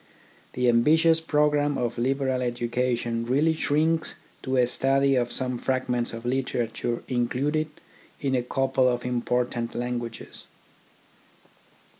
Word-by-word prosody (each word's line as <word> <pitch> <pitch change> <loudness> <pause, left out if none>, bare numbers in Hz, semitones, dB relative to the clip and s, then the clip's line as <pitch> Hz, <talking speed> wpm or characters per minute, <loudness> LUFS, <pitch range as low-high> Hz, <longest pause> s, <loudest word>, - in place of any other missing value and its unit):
The 125 0 0
ambitious 160 +7 +4
programme 150 -2 +2
of 120 -1 -2
a 120 - -3
liberal 130 0 0
education 120 -1 -1
really 140 +7 +2
shrinks 160 +1 0 0.3
to 130 0 -1
a 125 - +5
study 135 +2 +2
of 120 -1 0
some 125 -2 -1
fragments 125 -2 -1
of 115 +1 -8
literature 120 -2 -2
in 120 -2 0
cluded 150 +5 -1 0.5
in 135 -2 -1
a 125 - +2
couple 130 +1 +1
of 120 0 -2
important 125 -1 -1
languages. 120 -1 -5
125 Hz, 125 wpm, -26 LUFS, 120-140 Hz, 0.5 s, a